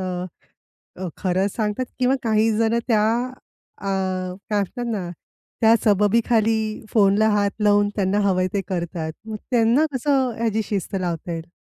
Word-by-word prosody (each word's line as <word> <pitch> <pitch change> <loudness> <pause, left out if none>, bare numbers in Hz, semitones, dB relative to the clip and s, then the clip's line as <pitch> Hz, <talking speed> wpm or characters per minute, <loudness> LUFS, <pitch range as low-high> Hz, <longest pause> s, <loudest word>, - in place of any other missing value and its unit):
अ, 180 -1 -5 0.7
खरंच 190 +1 0
सांगतात 215 +2 -1
किंवा 255 +1 +3
काही 220 -1 +2
जण 230 +1 +2
त्या 215 -2 +3 0.7
अ, - - -8 0.6
काय 205 -1 +2
असतात 245 +5 -5
ना, 200 -7 -3 0.5
त्या 225 0 +6
सबबीखाली 220 +1 +2
फोनला 210 0 +4
हात 205 -1 +2
लावून 205 0 +4
त्यांना 195 0 +1
हवंय 185 -1 +1
ते 200 - 0
करतात. 170 -3 -3
मग 220 - -4
त्यांना 240 +5 +3
कसं 265 0 +1
ह्याची 220 -1 0
शिस्त 200 -2 -3
लावता 175 -1 -3
येईल? 165 -1 -6
210 Hz, 140 wpm, -22 LUFS, 190-225 Hz, 0.7 s, त्या